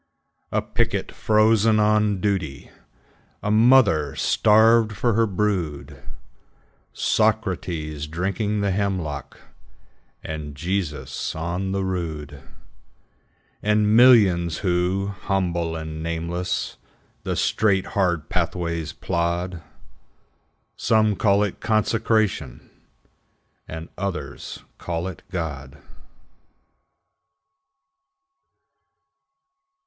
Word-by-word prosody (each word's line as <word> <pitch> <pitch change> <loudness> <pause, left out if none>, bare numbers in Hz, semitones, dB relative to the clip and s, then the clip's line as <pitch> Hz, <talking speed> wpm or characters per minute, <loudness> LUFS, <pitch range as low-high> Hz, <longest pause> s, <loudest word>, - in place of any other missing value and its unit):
A - - 0
picket - - -1
frozen 110 0 +3
on 105 -1 +2
duty, 90 -9 -2 0.7
A 105 - 0
mother 105 - +4
starved 110 +1 +4
for 120 +3 0
her 115 +1 +3
brood, 95 -7 -2 0.9
Socrates 90 -9 -1
drinking 100 +6 -2
the 100 -1 +1
hemlock, 95 -7 -3 0.8
And 75 -2 -6
Jesus 75 -4 -3
on 85 +4 -3
the 95 0 -1
rood; 80 -6 -4 1.2
And 105 0 +2
millions 100 -9 +5
who, 90 +2 +1
humble 85 -4 -1
and 80 -1 -6
nameless, 85 +2 -3 0.4
The - - -3
straight, 100 -3 +1
hard 85 -6 0
pathways 85 -2 -2
plod, 85 0 -2 1.1
Some 110 -2 +2
call 100 +1 +3
it 100 - -3
Consecration, 110 -1 0 1.0
And 80 +1 -7
others 85 -9 -5 0.2
call 85 +1 -3
it 95 -2 -8
God. 75 -5 -5
95 Hz, 80 wpm, -23 LUFS, 80-105 Hz, 1.2 s, millions